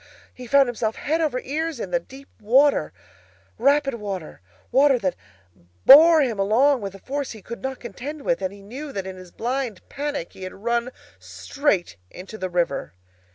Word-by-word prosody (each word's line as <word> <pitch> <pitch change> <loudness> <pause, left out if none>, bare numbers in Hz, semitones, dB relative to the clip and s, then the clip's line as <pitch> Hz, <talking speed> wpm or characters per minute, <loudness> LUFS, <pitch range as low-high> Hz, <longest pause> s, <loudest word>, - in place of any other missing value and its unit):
he 250 -1 -10
found 275 +2 +5
himself 225 -2 -2
head 320 +3 -1
over 295 -6 0
ears 315 +1 -3
in - - -5
deep 275 +1 -13
water, 265 +7 +3 0.7
rapid 280 +2 +3
water, 195 - -6 0.3
water 270 +1 +5
that 190 -6 -1 0.7
bore 315 +2 +9
him 230 -6 -2
along 245 +7 +3
with 195 -1 -6
a - - -9
force 275 +6 -4
he 220 - -12
could 235 - -8
not 265 0 -4
contend 270 +6 -7
with; 255 -5 0
and 190 -1 -2
he 200 0 -14
knew 275 +8 -8
that 195 -6 -4
in 190 0 -6
his 185 -1 -12
blind 240 -1 -4
panic 285 - -4
he - - -14
had 185 0 -7
run 235 +4 -1 0.3
straight 205 - -2
into 185 +4 -10
the 185 -3 -4
river! 170 - -2
245 Hz, 175 wpm, -23 LUFS, 195-280 Hz, 0.7 s, bore